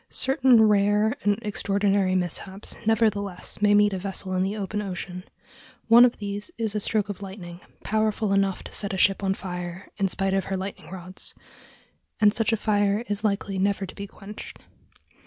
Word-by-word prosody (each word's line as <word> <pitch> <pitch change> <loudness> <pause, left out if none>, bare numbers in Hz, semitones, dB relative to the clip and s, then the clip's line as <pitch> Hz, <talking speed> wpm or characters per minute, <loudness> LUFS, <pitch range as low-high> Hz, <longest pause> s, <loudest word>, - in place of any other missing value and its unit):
Certain 260 -3 +4
rare 210 +1 +3
and 205 0 +2
extraordinary 200 -2 +1
mishaps 190 +2 -2
nevertheless 205 -4 0
may 205 0 +5
meet 205 -1 +4
a 190 - -2
vessel 190 0 -3
in 185 - +1
the 195 +3 -1
open 210 +1 -3
ocean. 180 -2 -5 0.7
One 235 +2 +9
of 245 - 0
these 205 +3 -4
is 220 -3 -1
a 210 - 0
stroke 210 0 +1
of 205 -1 -6
lightning, 185 -3 -8 0.2
powerful 215 -1 0
enough 195 -1 +1
to - - -9
set 200 -1 -2
a - - -3
ship 195 +1 +3
on 195 0 +1
fire 180 0 -6
in 195 - +1
spite 195 +1 0
of 195 0 0
her 195 - -2
lightning 190 +1 -7
rods, 185 0 -7 0.8
and 210 -1 +5
such 225 0 +1
a 225 - +2
fire 205 0 +1
is 205 +1 -1
likely 200 -2 -1
never 195 0 0
to 185 - -10
be 200 0 -7
quenched. 200 +2 -10
200 Hz, 180 wpm, -25 LUFS, 190-210 Hz, 0.8 s, One